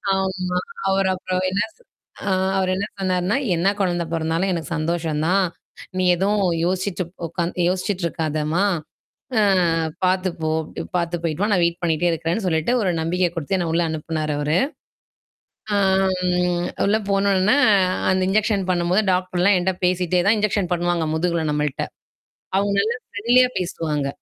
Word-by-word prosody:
ஆமா. 185 -1 -1 0.3
அவர 195 0 +2
அப்பறம் 185 0 -2
என்ன 195 +2 +1
சொ - - -27 0.5
ஆ - - +1 0.3
அவரு 185 -1 +1
என்ன 200 +2 -1
சொன்னாருன்னா, 185 +1 0 0.2
என்ன 170 +3 +1
குழந்தை 175 -3 0
பொறந்தாலும் 165 +3 0
எனக்கு 165 -4 -4
சந்தோஷம் 160 -1 -1
தான். 190 +2 +3 0.5
நீ 185 - +1
எதுவும் 200 +3 +1 0.2
யோசிச்சுட்டு 185 +1 -1 0.2
உட்காந் 170 +1 -3 0.2
யோசிச்சுட்டு 185 0 -2
இருக்காதம்மா! 155 +2 -1 0.8
அ - - +4 0.6
பார்த்துப்போ! 185 -4 0 0.2
இப்பிடி - - -7
பார்த்து 170 0 -2
போயிட்டு 165 +3 -1
வா! 210 - +1
நான் 180 - +3
வெயிட் 170 0 0
பண்ணிட்டே 170 +1 +1
இருக்கிறேன்னு 165 +5 -2
சொல்லிட்டு 160 +4 +1
ஒரு 190 - +1
நம்பிக்கை 175 +2 +1
குடுத்து 165 +4 -1
என்ன 175 -2 -1
உள்ள 170 - +2
அனுப்புனாரு 155 -1 -3
அவரு. 150 +3 +1 1.2
ஆம் 190 -1 +3 0.7
உள்ள 205 +2 +3
போனவுடன 195 +1 +3 0.6
அந்த 185 0 +2
இன்ஜெக்ஷன் 205 -1 +1
பண்ணும்போது 180 +4 +2
டாக்டர்லாம் 185 +1 +2
என்ட்ட 190 +1 0
பேசிட்டே 180 0 +1
தான் 220 - +5
இன்ஜெக்ஷன் 205 -3 0
பண்ணுவாங்க 175 -2 0
முதுகுல 170 0 0
நம்மள்ட்ட. 150 -2 -1 0.8
அவுங்க 200 0 0
எல்லாம் 235 +3 -3
ஃப்ரெண்ட்லியா 240 +5 +3
பேசுவாங்க. 155 -5 -2
180 Hz, 140 wpm, -22 LUFS, 165-195 Hz, 1.2 s, தான்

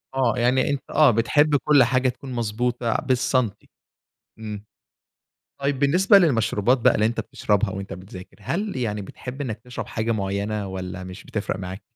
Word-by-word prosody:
آه، 125 -2 +1
يعني 125 +2 +2
أنت 140 -2 -1
آه، 155 -4 +5
بتحب 145 +7 +3
كل 145 -1 +5
حاجة 130 +1 +2
تكون 130 +1 -8
مضبوطة 120 +1 -1
بالسنتي 125 -4 0 0.7
إمم. 105 -2 -7 1.0
طيب، 140 -1 0
بالنسبة 180 +8 +5
للمشروبات 125 - +2
بقى - - +4
اللي 110 - +2
أنت 120 - -1
بتشربها 105 0 0
وأنت 95 0 -6
بتذاكر، 90 0 -10
هل 195 - -3
يعني 105 -4 -2
بتحب 125 +7 -9
إنك 120 -6 -3
تشرب 125 +1 -7
حاجة 115 +1 -2
معينة 100 0 -2
والّا 95 -1 -6
مش 90 +1 -9
بتفرق 110 -2 -3
معاك؟ 95 +1 -6
115 Hz, 155 wpm, -23 LUFS, 105-130 Hz, 1.0 s, آه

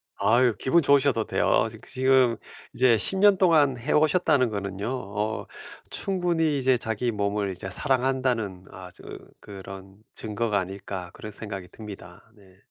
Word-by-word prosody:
아유 120 0 +2
기분 170 +6 +2
좋으셔도 140 -5 +3
돼요. - - +1
지 - - -12
지금 130 -3 +2 0.4
이제 125 -2 +3
10 190 - +2
년 200 -1 +5
동안 155 -8 +3
해 120 +5 -4
오셨다는 150 -5 +3
거는요. 100 0 -5
어 105 -3 -4 0.5
'충분히 170 -6 +1
이제 130 -1 +2
자기 115 +2 -2
몸을 100 -1 -2
이제 95 +1 -7
사랑한다는 125 -6 0
아 95 -1 -10
저 - - -14 0.4
그런 95 -1 -11 0.2
증거가 105 -1 -2
아닐까.' 95 -1 -6
그런 110 - -9
생각이 95 -4 -6
듭니다. 105 -1 -12
네. 95 -3 -21
115 Hz, 295 characters per minute, -25 LUFS, 100-130 Hz, 0.5 s, 년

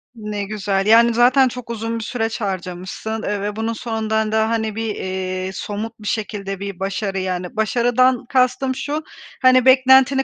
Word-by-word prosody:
Ne 210 -2 -4
güzel. 195 -1 -1
Yani, 230 +2 +6
zaten 255 +3 +5
çok 250 -1 -7
uzun 230 0 -3
bir - - -5
süreç 225 -1 -3
harcamışsın, 190 +3 -4
eee, 205 -1 -2
ve 205 +1 -3
bunun 225 +1 -2
sonunda 220 -1 -2
da, 220 0 +2
hani, 220 -2 -1
bir, 225 -1 -3
eee, 185 0 -3
somut 215 +4 -5
bir 210 - -8
şekilde 200 -3 -3
bir 200 -2 -6
başarı 195 0 -2
yani, 185 0 -4
başarıdan 245 +3 +2
kastım 260 0 +1
şu: 295 +4 -3 0.4
Hani, 255 -1 +5
beklentini 265 +1 +5
220 Hz, 165 wpm, -20 LUFS, 200-245 Hz, 0.4 s, Yani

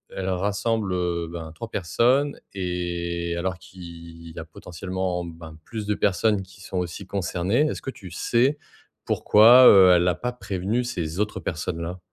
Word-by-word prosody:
elle 95 0 -3
rassemble, 100 +2 -1
heu, 85 -2 -1
ben, 80 -2 -7
3 115 +5 -7
personnes 125 - +1
et 85 -2 -3
alors 95 +1 -2
qu'il 85 -2 -12
y - - -9
a 80 - -7
potentiellement, 90 +1 -4
ben, 80 -2 -11
plus 110 -2 -6
de 105 - +1
personnes 100 +1 +1
qui 95 +1 -17
sont 95 0 -6
aussi 90 +2 -5
concernées. 100 - 0
Est-ce - - -5
que 135 - -5
tu 95 -8 -12
sais, 125 - +1 0.5
pourquoi, 120 +4 +7
heu, 95 -2 +8
elle 90 +1 +2
a 90 - +2
pas 125 0 -3
prévenu 105 +1 -2
ces 90 -6 -4
autres 105 0 -1
personnes-là? 85 +2 -4
95 Hz, 165 wpm, -24 LUFS, 85-105 Hz, 0.5 s, heu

